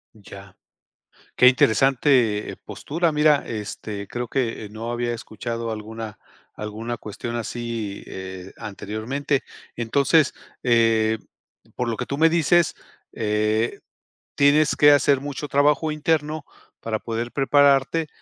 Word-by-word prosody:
Ya. 100 -2 -13 0.8
Qué 125 - +8
interesante, 125 -3 +3
eh, - - -10
postura. 165 +2 -2
Mira, 150 -1 +3
este, 105 -2 -5
creo 120 0 -4
que 115 -4 -2
no 110 +2 -6
había 120 0 -1
escuchado 115 0 -5
alguna 110 0 -6 0.4
alguna 110 +3 -5
cuestión 115 +2 -6
así, 115 -3 -4
eh, 95 0 -8
anteriormente. 120 +8 -3 0.3
Entonces, 140 +6 +2 0.3
eh, 115 -2 +3 0.6
por 125 - -1
lo 115 - -1
que - - -4
tú 140 - -4
me 160 +2 +5
dices, 170 +1 +3 0.4
eh, 110 +1 0 0.6
tienes 145 +2 +4
que 145 0 +7
hacer 140 -1 +4
mucho 145 +1 -5
trabajo 150 +2 +2
interno 155 0 -1 0.4
para 110 -1 -2
poder 115 +2 -4
prepararte, 140 +2 +3
120 Hz, 120 wpm, -23 LUFS, 110-145 Hz, 0.8 s, Qué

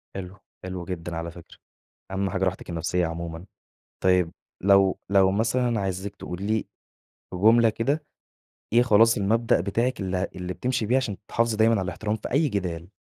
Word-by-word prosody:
حلو، 95 0 -7 0.3
حلو 90 -2 -5
جدًا 85 -2 -5
على 85 +1 -4
فكرة، 85 -1 -14 0.5
أهم 95 0 -1
حاجة 95 -1 0
راحتِك 95 -1 -3
النفسية 85 +1 0
عمومًا. 85 +1 -6 0.6
طيب 90 -2 +3 0.3
لو 100 0 +4
لو 95 -1 +5
مثلًا 115 +3 +1
عايزِك 95 +1 -3
تقولي 90 0 -6
لي 110 0 0 0.7
جملة 115 +5 +5
كده، 140 +8 -1 0.7
إيه 120 - +6
خلاص 115 0 +5
المبدأ 115 +4 +2
بتاعِك 115 +5 -1
اللي 95 -1 -2
ه 90 - -1
اللي 90 0 -4
بتمشي 125 -1 -1
بيه 125 - +3
عشان 125 -7 -1
تحافظي 115 -1 +1
دايمًا 110 +1 +4
على 100 - 0
الاحترام 105 +3 -2
في 110 - -7
أي 150 +3 +3
جدال؟ 90 -6 -3
100 Hz, 165 wpm, -25 LUFS, 90-115 Hz, 0.7 s, إيه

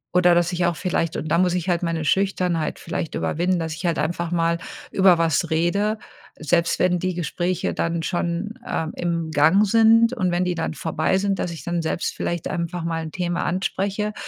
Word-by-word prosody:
Oder 180 -1 +5
dass 175 +1 +2
ich 175 0 +1
auch 175 - 0
vielleicht 165 -2 -1
und - - -4
da 170 +2 +3
muss 180 -1 +2
ich 180 0 -2
halt 175 0 +1
meine 165 -2 -2
Schüchternheit 180 -3 0
vielleicht 165 - -4
überwinden, 180 +2 0
dass 160 -2 -3
ich 165 +3 -8
halt 165 - 0
einfach 170 +1 -1
mal 170 -1 +1 0.3
über 190 -2 +5
was 165 -3 +1
rede. 200 +7 +1 0.4
Selbst 170 +2 +1
wenn 180 -1 +2
die 185 0 -2
Gespräche 175 +1 -2
dann 170 0 -1
schon, 175 +5 -2
ähm, 160 0 -2
im 170 -2 -2
Gang 160 +8 +4
sind 230 +2 +5
und 185 -8 0
wenn 175 +1 +1
die 180 - -1
dann 165 - -2
vorbei 160 +5 0
sind, 195 -1 -1
dass 175 - -2
ich 160 -5 -8
dann 175 +1 -1
selbst 160 - -2
vielleicht 170 -1 -3
einfach 170 -1 -3
mal 165 -1 -2
'n 155 - -7
Thema 175 -1 -2
anspreche, 195 +3 -1
175 Hz, 200 wpm, -23 LUFS, 165-185 Hz, 0.4 s, Oder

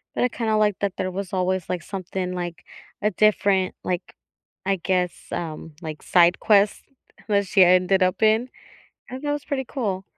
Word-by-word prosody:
but - - +1
I 250 - +3
kinda 225 -2 -1
like 210 -3 +2
that 200 -2 -1
there 185 0 -2
was 190 0 -5
always, 185 -1 -1
like, 175 -3 -2
something, 185 0 -4
like, 175 -2 -5 0.4
a 210 +1 +1
different, 200 -2 +2
like, 180 0 -3 0.5
I 195 0 +1
guess, 180 0 -2
um, 160 -2 -5
like, 155 -2 -7
side 175 0 +4
quest 205 -1 +3 0.4
that 200 -2 +2
she 190 0 +5
ended 185 +2 +4
up 185 0 0
in 220 +3 +3 0.6
and 260 +2 -7
that 290 -1 -1
was 290 -1 -4
pretty 270 -2 -2
cool. 200 -9 -3
190 Hz, 175 wpm, -23 LUFS, 180-215 Hz, 0.6 s, she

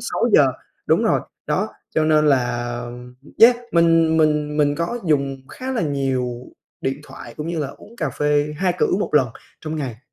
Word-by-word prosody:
6:00. - - +3 0.3
Đúng - - +3
rồi, - - +2 0.3
đó, - - 0 0.3
cho 155 - +2
nên 155 -1 +3
là 120 -3 +1 0.7
yeah, 240 +2 +8 0.2
mình 165 -1 +4
mình 150 -1 +1
mình 145 -1 +2
có 170 +10 -2
dùng 140 -3 0
khá 260 +1 -5
là 245 - -1
nhiều 130 -4 -2 0.3
điện 135 +2 -2
thoại, - - -11
cũng 150 - -5
như 170 0 -3
là 145 -3 -2
uống 220 +10 -14
cà 155 -8 -2
phê 150 +1 +1
2 180 +1 +1
cữ - - +3
1 205 - -3
lần 135 -4 +4 0.3
trong 155 0 -5
ngày. 130 -7 -4
150 Hz, 180 wpm, -21 LUFS, 135-165 Hz, 0.7 s, yeah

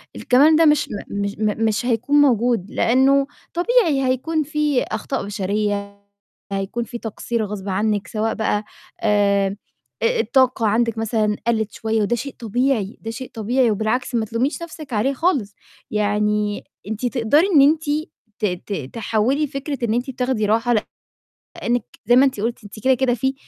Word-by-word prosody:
الكمال 285 +5 +4
ده 325 +1 +5
مش 300 -2 +3
م - - -5 0.3
مش 200 0 -2
م 215 +1 0
مش 220 +2 0
هيكون 245 +4 +1
موجود 235 -6 +2
لأنه 270 +3 +3 0.3
طبيعي 345 - +2
هيكون 310 +5 0
فيه 300 -2 0
أخطاء 220 +2 -3
بشرية، 200 0 -2 0.5
هيكون 195 +4 -2
فيه 240 - -7
تقصير 225 0 -3
غصب 200 -1 -6
عنِّك 205 0 0
سواء 220 +2 -1
بقى 215 -1 -1 0.4
آآ، 200 -2 +2 0.5
أ 470 0 +2
الطاقة 255 -4 +2
عندِك 230 +1 +1
مثلًا 215 -1 0
قَلِّت 220 -3 +1
شوية 220 0 -1
وده 210 +3 +1
شيء 255 +3 -5
طبيعي، 230 -2 0
ده 225 - -5
شيء 255 +3 -7
طبيعي، 235 +2 +1
وبالعكس 220 +5 -1
ما 225 -2 +1
تلوميش 240 +9 -1
نَفْسِك 310 -5 -9
عليه 235 +6 +1
خالص، 265 - 0 0.4
يعني 210 0 0 0.2
أنتِ 220 +3 -3
تقدَري 250 - +3
إن 280 - +8
أنتِ 305 +3 +4 0.6
ت - - 0 0.2
ت 205 - -3 0.2
تحوِّلي 230 +6 0
فكرة 275 +1 -5
إن 220 - 0
أنتِ 245 +3 -1
بتاخدي 250 -3 -1
راحة 230 +3 +2 0.8
لإنِّك 240 -2 -1 0.2
زَي 240 - +5
ما 260 +2 +7
أنتِ 260 -6 -1
قُلتِ 230 +1 -3
أنتِ 205 +1 -10
كده، 265 - +5
كده، 255 -1 +1
فيه 265 +3 0
230 Hz, 160 wpm, -21 LUFS, 210-265 Hz, 0.8 s, إن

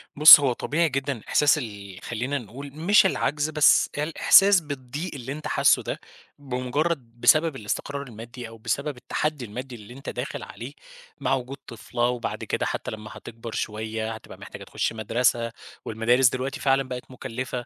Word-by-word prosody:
بُصّ، 150 +1 +11
هو 135 -3 +1
طبيعي 160 +7 0
جدًا 135 -3 -3
إحساس 150 0 +4
ال 100 -7 -7
خلّينا 125 +5 -3
نقول 135 +4 -9
مش 185 +7 +4
العجز 150 -5 0
بس 150 -1 +4
الإحساس 180 +6 +5
بالضيق 145 +3 -6
اللي 130 -1 -7
أنت 150 +2 -5
حاسّه - - +3
ده - - -4 0.4
بمجرد 130 -1 -3
بسبب 155 -1 +4
الاستقرار 140 +5 -4
المادي، 120 0 -9
أو 115 0 -12
بسبب 115 +5 -3
التحدي 150 +1 -3
المادي 125 +4 -7
اللي 105 +1 -12
أنت 135 +3 -8
داخل - - -5
عليه - - -9 0.5
مع - - 0
وجود 130 +1 -6
طفلة، 120 +1 -2
وبَعد 125 -1 -4
كده - - -2
حتى - - -4
لمّا 110 0 -8
هتكبر 115 0 -9
شوية 110 +1 -3
هتبقى 110 - -12
محتاجة - - -10
تخش - - -2
مدرسة، 115 +1 0 0.3
والمدارس 120 +3 +3
دلوقتي 130 +3 -4
فعلًا 135 0 +2
بقت 125 -1 -8
مكلّفة، 125 -1 -5
130 Hz, 160 wpm, -25 LUFS, 115-145 Hz, 0.5 s, بُصّ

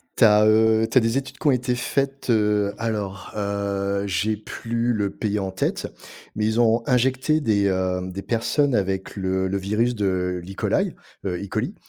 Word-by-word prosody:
Tu - - +3
as, 105 -1 +6
heu, 110 +1 +4
tu 120 - +1
as - - +7
des 115 +3 +1
études 135 0 -5
qui - - -2
ont - - +6
été 125 -1 0
faites, 135 +1 -1
heu, 105 -2 +2
alors, 105 -4 -3
heu, 100 -1 -1
j'ai 105 +3 0
plus 115 +3 -2
le 100 -2 -1
pays 105 0 -2
en 95 -2 -2
tête, 95 - -2 0.4
mais 105 - 0
ils 110 +2 +1
ont 115 0 +4
injecté 130 +4 +2
des, 105 -8 +2
heu, 95 -1 0
des 100 +2 -6
personnes 130 +4 +1
avec 95 -3 -1
le 95 -1 -1
le 100 +1 -1
virus 105 +5 0
de 90 -4 -1
l'E. 95 +3 -8
coli, - - 0 0.3
heu, 90 -2 -2
E. 100 - -6
coli - - -3
105 Hz, 190 wpm, -23 LUFS, 100-120 Hz, 0.4 s, as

